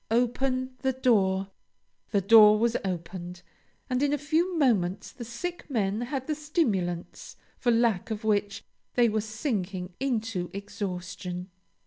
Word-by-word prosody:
Open 255 Hz, +2 st, +1 dB
the 265 Hz, -1 st, 0 dB
door!" 195 Hz, -7 st, +2 dB, 0.6 s
The 200 Hz, -, +2 dB
door 215 Hz, +1 st, +8 dB
was 235 Hz, +2 st, +1 dB
opened, 180 Hz, -1 st, -5 dB, 0.4 s
and 255 Hz, 0 st, 0 dB
in 290 Hz, 0 st, +2 dB
a -, -, +2 dB
few 325 Hz, +5 st, 0 dB
moments 200 Hz, -, +1 dB
the 240 Hz, -, -8 dB
sick 325 Hz, +11 st, -6 dB
men 210 Hz, -4 st, 0 dB
had 260 Hz, +1 st, -3 dB
the 310 Hz, -, -1 dB
stimulants 225 Hz, -, -2 dB, 0.2 s
for 245 Hz, -, +1 dB
lack 230 Hz, -5 st, +2 dB
of 220 Hz, 0 st, -4 dB
which 205 Hz, -2 st, 0 dB, 0.3 s
they 240 Hz, -1 st, +5 dB
were 215 Hz, 0 st, 0 dB
sinking 205 Hz, -, -3 dB
into 225 Hz, -8 st, -1 dB
exhaustion. 180 Hz, -2 st, -5 dB
220 Hz, 135 wpm, -28 LUFS, 190-255 Hz, 0.6 s, door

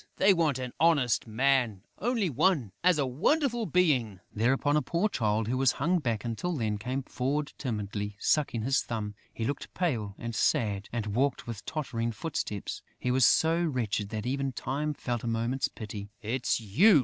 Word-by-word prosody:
They 195 Hz, +1 st, +6 dB
want 160 Hz, -6 st, +2 dB
an 125 Hz, -1 st, -5 dB
honest 145 Hz, -9 st, +3 dB
man; 120 Hz, -3 st, +1 dB, 0.2 s
only 230 Hz, -2 st, +1 dB
one, 145 Hz, -, +2 dB
as 180 Hz, -2 st, +5 dB
a 145 Hz, -, +2 dB
wonderful 235 Hz, -, +1 dB
being." 135 Hz, -, +2 dB
Thereupon, 135 Hz, +6 st, +2 dB
a 150 Hz, -, +4 dB
poor 170 Hz, +7 st, +1 dB
Child, 110 Hz, -, 0 dB
who 130 Hz, +2 st, 0 dB
had 135 Hz, -1 st, +5 dB
hung 175 Hz, +6 st, +1 dB
back, 115 Hz, -7 st, -2 dB
until 120 Hz, +10 st, -2 dB
then, 110 Hz, -8 st, -1 dB
came 130 Hz, +5 st, -3 dB
forward 140 Hz, +4 st, -2 dB
timidly, 105 Hz, -4 st, -3 dB
sucking 120 Hz, -2 st, +1 dB
his 135 Hz, +3 st, +2 dB
thumb. 105 Hz, -3 st, -4 dB, 0.2 s
He 115 Hz, -, -4 dB
looked 140 Hz, +3 st, -3 dB
pale 115 Hz, -, -1 dB
and 115 Hz, -1 st, -5 dB
sad 105 Hz, -2 st, +1 dB
and 115 Hz, -3 st, -2 dB
walked 135 Hz, +2 st, +1 dB
with 115 Hz, -3 st, -6 dB
tottering 115 Hz, -7 st, -2 dB
footsteps; 110 Hz, -, -4 dB, 0.2 s
he 125 Hz, -, 0 dB
was 130 Hz, 0 st, +5 dB
so 165 Hz, +2 st, +3 dB
wretched 115 Hz, -9 st, -1 dB
that 110 Hz, 0 st, -4 dB
even 135 Hz, +1 st, -1 dB
Time 145 Hz, +5 st, -2 dB
felt 120 Hz, -4 st, -3 dB
a -, -, -3 dB
moment's 115 Hz, +3 st, 0 dB
pity: 105 Hz, -2 st, -7 dB
"It's 120 Hz, +3 st, 0 dB
you!" 150 Hz, -, +5 dB
125 Hz, 175 wpm, -29 LUFS, 110-150 Hz, 0.2 s, They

